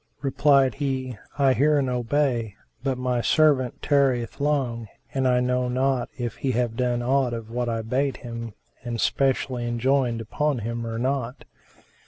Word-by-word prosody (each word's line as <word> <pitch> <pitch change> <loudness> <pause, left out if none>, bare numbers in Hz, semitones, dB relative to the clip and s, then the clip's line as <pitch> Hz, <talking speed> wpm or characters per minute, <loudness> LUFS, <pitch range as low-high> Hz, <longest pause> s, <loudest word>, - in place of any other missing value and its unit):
Replied 135 0 +3
he, 130 -3 -3 0.2
"I 135 -2 +4
hear 150 +3 +3
and 135 -2 +1
obey; 125 -3 0 0.3
but 135 -1 -1
my 125 -1 0
servant 140 -4 +2
tarrieth 135 -4 +1
long 130 -6 0 0.3
and 130 -1 +1
I 125 0 +3
know 125 0 +1
not 130 0 0
if 120 -2 -4
he 130 -2 -1
have 120 -1 0
done 120 -1 0
aught 130 -1 +2
of 115 -1 -8
what 120 0 -1
I 115 -1 -2
bade 130 +4 0
him 115 -2 -7 0.3
and 120 -2 -4
specially 130 -2 0
enjoined 120 0 +1
upon 140 +6 -1
him, 115 +1 -4
or 115 0 -4
not." 130 0 -2
125 Hz, 160 wpm, -25 LUFS, 120-135 Hz, 0.3 s, I